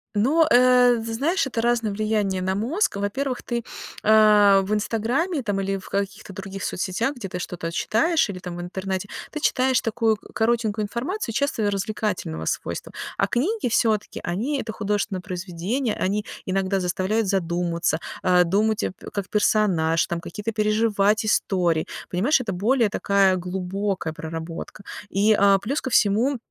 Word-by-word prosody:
Ну, 285 +10 +4
э, 245 -1 +6
з 225 0 -5
знаешь, 290 - +1
это 230 -3 -2
разное 230 -3 +1
влияние 210 -3 0
на 190 +1 0
мозг. 245 - 0
Во-первых, 250 +6 -2
ты, 235 -1 -3 0.4
а, 210 -2 +6
в 200 +2 -2
"Инстаграме" 240 - 0
там 205 -4 -1
или 195 0 -1
в 190 - -11
каких-то 200 0 -4
других 195 0 -6
соцсетях, 195 +9 -1
где 220 -7 -7
ты 180 - -5
что-то 170 -2 -5
читаешь 320 - +1
или 185 -2 -5
там 175 -1 -7
в - - -5
интернете, 190 +2 -4 0.2
ты 305 - -4
читаешь 260 -3 +2
такую 225 -1 +1 0.2
коротенькую 225 -2 +1
информацию, 235 - -3
часто 230 -6 0
развлекательного 195 - -3
свойства, - - -3 0.3
а 195 - +2
книги 285 - 0
всё-таки, 220 -2 +1
они- 245 +11 -1
это 220 -1 -6
художественные 205 -2 -2
произведения, 190 +6 -3
они 205 +2 -1 0.2
иногда 195 +1 0
заставляют 190 +4 0
задуматься, 170 -3 0 0.2
а, 180 -1 +4
думать, 210 +5 +1 0.3
как 200 -2 -3
персонаж, 185 -7 +2
там 170 -1 -2
какие-то 210 +6 -5
переживать 215 -1 +2
истории. 175 -6 +1 0.2
Понимаешь, 235 - +2
это 225 -5 -3
более 220 +5 +2
такая 195 -2 +2
глубокая 185 0 -3
проработка 165 +5 -7 0.3
и, 205 +3 +3
а, 200 -1 +6
плюс 270 +9 -2
ко - - -4
всему, 235 +5 +3
205 Hz, 150 wpm, -24 LUFS, 190-230 Hz, 0.4 s, э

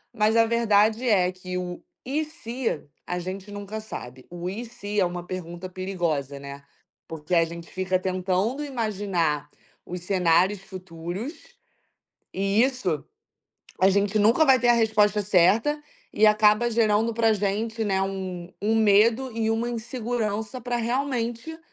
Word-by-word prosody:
Mas 215 +2 +3
a 230 - +6
verdade 225 0 +3
é 185 -5 +4
que 185 0 -6
o 180 -1 -5 0.2
"e 295 +4 0
se?" 250 - -4 0.2
a 180 - -3
gente 190 +3 -6
nunca 205 +1 -6
sabe. 130 - -9
O 175 +1 -5
"e 215 +5 -5
se?" 210 -3 -4
é 185 - +4
uma 175 0 -4
pergunta 180 0 -6
perigosa, 170 -7 -2
né, 140 0 -9 0.4
porque 160 +2 -3
a 165 - +5
gente 170 0 -9
fica 185 0 -1
tentando 190 +8 -1
imaginar 195 - -1 0.4
os 180 0 -6
cenários 185 +1 +2
futuros, 185 - -6 1.0
e 195 +4 +2
isso 250 - -1 0.8
a 190 - +6
gente 200 +2 +2
nunca 225 +9 +5
vai 265 -3 +6
ter 240 - +2
a - - +8
resposta 215 -2 +3
certa, 210 - +3 0.3
e 215 - +5
acaba 215 +2 +4
gerando 225 0 +2
pra 225 -1 +3
gente, 215 +3 -1
né, 195 -2 +1
um 185 -2 -5
um 220 +2 +2
medo 225 +4 +4
e 225 -1 +1
uma 225 +2 0
insegurança 230 -1 -3
pra 245 +1 -2
realmente 240 +3 -2
205 Hz, 145 wpm, -25 LUFS, 180-230 Hz, 1.0 s, a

